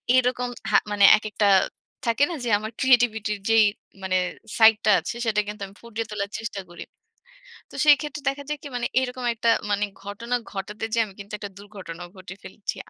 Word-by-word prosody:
এরকম 250 -1 +2 0.2
হা - - +6
মানে 205 -1 +2 0.2
একেকটা, 215 -1 -1 0.6
থাকে 230 +5 +3
না? - - -3
যে - - -1
আমার 215 +1 -6
ক্রিয়েটিভিটি 240 -5 +3
র - - -20
যেই 225 -1 +6 0.4
মানে 185 -1 +1 0.4
সাইডটা 220 -1 +6
আছে, - - -5
সেটা 220 -2 +1
কিন্তু 210 0 -7
আমি 195 - -17
ফুটিয়ে 230 -1 -5
তোলার 200 -1 -3
চেষ্টা 225 -3 -5
করি। 175 - -9 0.9
তো - - -12
সেইক্ষেত্রে 295 0 +3
দেখা 280 +1 -5
যায় 300 - -2
কি, - - -6
মানে 240 -1 -1
এরকম 250 -1 -4
একটা 230 +1 +1 0.2
মানে 205 0 +1 0.2
ঘটনা 230 +5 -3 0.2
ঘটাতে 210 +2 -5
যেয়ে 230 -1 +3
আমি 200 - -13
কিন্তু 200 +1 -10
একটা 205 -1 -7
দুর্ঘটনাও 190 -4 -9
ঘটিয়ে 185 +1 -10
ফেলেছি। 205 - -6
215 Hz, 180 wpm, -24 LUFS, 205-245 Hz, 0.9 s, হা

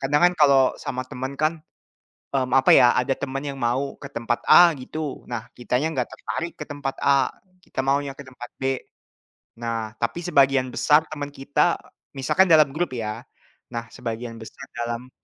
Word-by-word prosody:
kadang 145 +2 +1
kan - - -6
kalau 140 -2 +6 0.2
sama 130 0 -3
temen 130 +2 -5
kan 155 +1 +3 0.8
mmm, 130 -2 0
apa 135 0 +5
ya, 120 - +7
ada 130 +2 +1
temen 135 -1 -4
yang 140 - -4
mau 130 +4 -1
ke 140 - -8
tempat 115 0 -2
A 175 -1 +8
gitu. 145 +2 -6
Nah, 115 -2 -4
kitanya 125 +5 -1
nggak - - -1
tertarik 170 +1 -4
ke 150 - -5
tempat 145 -2 -4
A, 140 -2 +3 0.3
kita - - -8
maunya 140 0 +1
ke 140 - -9
tempat 125 -1 -10
B. - - -7 1.0
Nah, 115 -2 -3
tapi 120 +9 -2
sebagian 135 -5 +3
besar 150 +1 +4
temen 145 -2 -4
kita, 150 +5 +1 0.4
misalnya 165 +6 +4
dalam 150 -2 +5
grup 175 +1 -1
ya. 110 -2 -4 0.5
Nah, 115 0 -3
sebagian 115 -1 -6
besar 110 - -10
dalam, 120 +1 -4
135 Hz, 170 wpm, -24 LUFS, 120-145 Hz, 1.0 s, A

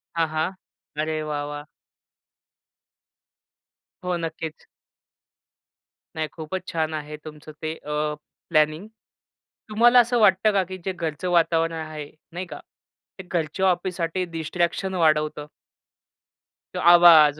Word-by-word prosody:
हां, 165 -1 +2
हां. 155 +3 -1 0.5
अरे 155 0 -1
वाह! 150 -1 -3
वाह! 145 0 -6 2.4
हो, 180 0 0
नक्कीच. 160 -1 -6 1.5
नाही 155 -1 -1
खूपच 175 +3 -6
छान 160 -1 -1
आहे 150 0 -5
तुमचं 155 0 -10
ते, 155 0 -2
अ, 150 0 -2 0.3
प्लॅनिंग. 155 +3 +2 0.8
तुम्हाला 240 +3 +6
असं 240 0 +3
वाटतं 210 0 +5
का 195 -1 +3
की 185 - -5
जे 190 - 0
घरचं 170 0 -3
वातावरण 165 -1 +3
आहे, 155 -2 -6 0.2
नाही 180 +2 -5
का. - - -9 0.6
ते - - -6
घरच्या 175 0 -1
ऑफिससाठी 180 -1 0
डिस्ट्रॅक्शन 170 +4 -1
वाढवतं? 155 -3 +2 1.3
तो - - -3
आवाज 165 -4 +8
165 Hz, 115 wpm, -24 LUFS, 155-180 Hz, 2.4 s, आवाज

